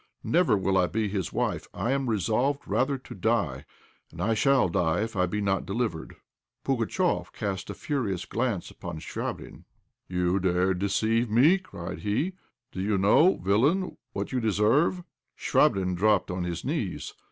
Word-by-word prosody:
Never 165 - +3
will 95 0 +1
I 90 - +3
be 110 +2 -1
his 95 -3 -2
wife. - - -2
I 120 - -1
am 135 -2 0
resolved 115 - 0
rather 135 +2 +1
to 130 - -11
die, 90 - 0 0.5
and - - -12
I 115 - +1
shall 135 +1 +3
die 85 +1 +1
if 115 0 -3
I 90 -1 +2
be 105 +4 -2
not 95 -2 0
delivered." 100 -4 -3 0.5
Pugatchéf 135 - 0
cast 100 -4 -4
a - - -5
furious 110 - -2
glance 115 -6 -2
upon 85 -2 -7
Chvabrine. - - -6 0.4
"You 90 +1 +1
dared 90 0 +1
deceive 110 +4 +1
me," 140 - +5
cried 90 - -8
he. 120 - -1 0.4
"Do 95 - -5
you 100 +1 +1
know, 105 - +5
villain, 135 - +1 0.2
what - - -4
you 130 - 0
deserve?" 115 - +2 0.3
Chvabrine 95 -1 +2
dropped 105 0 +2
on 90 0 -2
his 85 -1 -4
knees. - - -3
105 Hz, 160 wpm, -27 LUFS, 95-130 Hz, 0.5 s, me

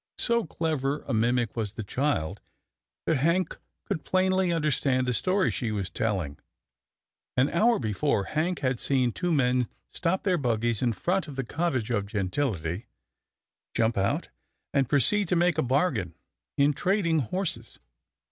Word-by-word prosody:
So 235 -2 +2
clever 150 -3 -1
a - - -1
mimic 120 0 +1
was 110 -3 -2
the 110 - -5
child, 100 - -1 0.6
that 160 - +2
Hank 170 +7 +1 0.3
could 190 -6 -3
plainly 185 -1 +2
understand 145 -5 +1
the 125 - 0
story 185 - +2
she 115 -4 -2
was 100 -3 -3
telling. 95 -10 -2 1.0
An 130 +3 +3
hour 225 +6 +4
before. 110 0 0
Hank 160 - -1
had 130 -2 0
seen 130 -3 +2
two 180 +8 -2
men 125 -5 +2 0.2
stop 180 +2 -1
their 185 -4 +2
buggies 115 -3 0
in 120 -3 +2
front 180 - 0
of 145 - -8
the 135 - -2
cottage 130 -4 -1
of 100 -3 0
gentility, 100 - -2 0.9
jump 115 0 +2
out, 100 0 0 0.4
and 135 -3 +2
proceed 195 +8 +3
to 180 - +2
make 175 -2 +2
a - - +4
bargain 130 - 0 0.4
in 140 +1 +4
trading 175 -1 +1
horses. 175 - -2
135 Hz, 150 wpm, -27 LUFS, 115-170 Hz, 1.0 s, hour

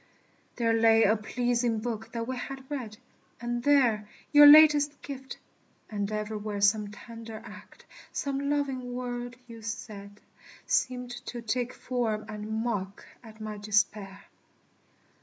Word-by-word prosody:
There 230 -2 +1
lay 225 0 +5
a 215 - +4
pleasing 240 +1 0
book 225 0 -4
that 230 -1 -4
we 260 - -2
had 265 +1 -7
read 235 -7 -5 0.4
And 240 0 -2
there 240 -7 +3 0.2
your 295 0 +9
latest 295 -1 +7
gift; 265 -1 -7 0.5
and 205 -1 -2
everywhere 210 -1 -3
Some 205 +1 +3
tender 225 +1 -9
act, - - -13 0.3
some 280 0 -2
loving 265 -4 -2
word 245 -1 -4
you 230 -2 -11
said, 210 -3 -7 0.5
Seemed 250 -1 0 0.2
to 240 -1 -6
take 245 +2 -1
form 225 -4 -2
and 215 +1 -4
mock 200 -5 -3 0.2
at 220 -1 -13
my 215 -1 -6
despair. 205 -1 0
230 Hz, 130 wpm, -28 LUFS, 215-250 Hz, 0.5 s, your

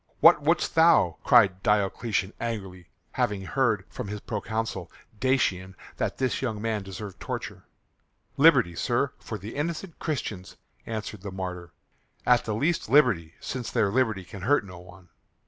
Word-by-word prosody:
"What 165 -2 +7
wouldst 165 +4 +1
thou?" 165 +1 +5
cried 100 -7 +5
Diocletian 105 0 0
angrily, 95 -6 -5 0.2
having 100 -2 -1
heard 110 -2 +1
from 125 - -7
his 105 +1 -5
proconsul 110 -3 -4 0.3
Dacian 95 -7 +1 0.2
that - - -2
this 130 -1 -1
young 110 -5 -2
man 110 -1 -1
deserved 95 -1 -8
torture. - - -6 0.7
"Liberty, 135 - +5
sir, 120 +9 0
for 110 - -6
the 105 +3 -8
innocent 165 +3 -4
Christians," 110 - -4 0.3
answered 110 -2 -5
the 100 - -6
martyr. 90 -2 -6 0.5
"At 125 0 +4
the 110 - -2
least 155 +2 0
liberty, 110 - +3
since 125 -3 -5
their 100 - +1
liberty 110 -6 +1
can 95 +2 -10
hurt 125 +3 +2
no 90 -2 -10
one." 90 0 -15
110 Hz, 145 wpm, -27 LUFS, 95-130 Hz, 0.7 s, What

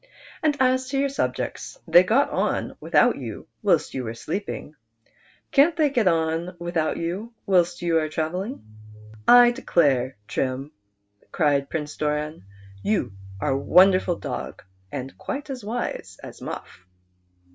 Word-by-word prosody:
And 300 -2 +1
as 260 0 +2
to 275 - -1
your 275 0 +2
subjects, 280 - -3
they - - +8
got - - +2
on - - -1
without - - +3
you - - -7 0.2
whilst 195 -7 +2
you 130 - -3
were 115 -1 -5
sleeping; 155 - -5 0.8
can't 300 +4 +5
they 305 -4 +2
get 235 -7 +2
on 165 +1 0
witliout 170 -2 -1
you 195 +8 -4
whilst 175 -3 +2
you 165 -1 +3
are 155 -1 -2
travelling? 180 - -3 0.3
" 105 0 -19
"I 240 0 +6
declare. 135 - +1
Trim," 135 +2 -2 0.6
cried 145 -4 +1
Prince 150 -2 -4
Doran, 150 -5 -2 0.4
"you 165 - 0 0.3
are 135 - 0
a 135 - +1
wonderful 185 +3 +5
dog, - - -6 0.3
and 135 -1 -6
quite 285 +1 -5
as 255 -4 -6
wise 235 +4 -4
as - - -10
Alufif." 90 - -8
170 Hz, 145 wpm, -24 LUFS, 150-235 Hz, 0.8 s, they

